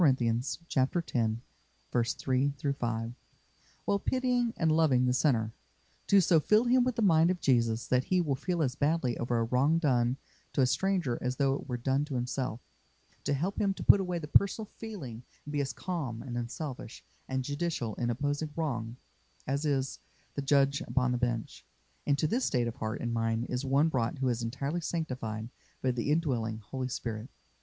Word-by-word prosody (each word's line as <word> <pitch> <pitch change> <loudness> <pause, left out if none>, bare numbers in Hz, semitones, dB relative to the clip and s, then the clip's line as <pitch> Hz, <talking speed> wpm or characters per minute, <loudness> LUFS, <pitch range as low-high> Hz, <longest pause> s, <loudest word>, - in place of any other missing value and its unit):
x. 130 0 +2
3 125 - -1 0.3
5), 115 0 -2 0.7
while 200 - +2
pitying 250 0 +1
and 160 -2 +2
loving 150 -6 +4
the 125 - +2
sinner; 115 -5 +2 0.5
to 200 - +6
so 170 -2 +5
fill 215 +8 +4
him 250 +1 +4
with 250 -1 0
the 230 - 0
mind 165 -3 +5
of 180 -1 0
Jesus 115 -5 +2
that 125 0 +2
he 185 - +2
will 155 -5 +1
feel 170 +5 -1
as 130 -3 0
badly 145 -3 +1
over 120 0 0
a 115 - +2
wrong 130 +7 +3
done 125 -5 +2 0.4
to - - +2
a - - +6
stranger 175 -4 +1
as 125 +1 -1
though 135 0 +2
it 140 - -5
were 125 - -1
done 135 +3 +1
to 145 -3 -5
himself; 125 -1 -2 0.6
to 145 - +1
help 180 +8 -1
him 195 -1 +2
to - - -6
put - - +7
away 180 -2 -1
the 155 -3 -5
personal 200 +7 +3
feeling 185 - -8 0.2
and 145 - -6
be 145 -1 +1
as 135 -1 -2
calm 130 - -4
and 125 -2 -6
unselfish 120 +1 -5 0.2
and 130 0 -1
judicial 145 -5 -2
in 120 +2 -2
opposing 145 +5 -1
wrong 120 -7 -2 0.5
as 140 +3 -1
is 135 -2 0 0.3
the 140 - -2
judge 140 0 +3
upon 125 -1 +1
the 125 - +1
bench. 120 -2 -2 0.4
Into 140 +1 +2
this 235 - +1
state 120 -3 +1
of 115 - -5
heart 110 0 -3
and 120 -1 -2
mind 115 0 0
is 125 +1 -2
one 140 +3 +3
brought 120 -3 -1
who 130 -1 +1
is 120 -1 -1
entirely 140 +8 -2
sanctified 125 -10 -3 0.3
by 130 - +3
the 120 +2 -2
indwelling 125 -9 0
Holy 130 +4 -4
Spirit. 115 -2 -4
135 Hz, 180 wpm, -30 LUFS, 120-160 Hz, 0.7 s, put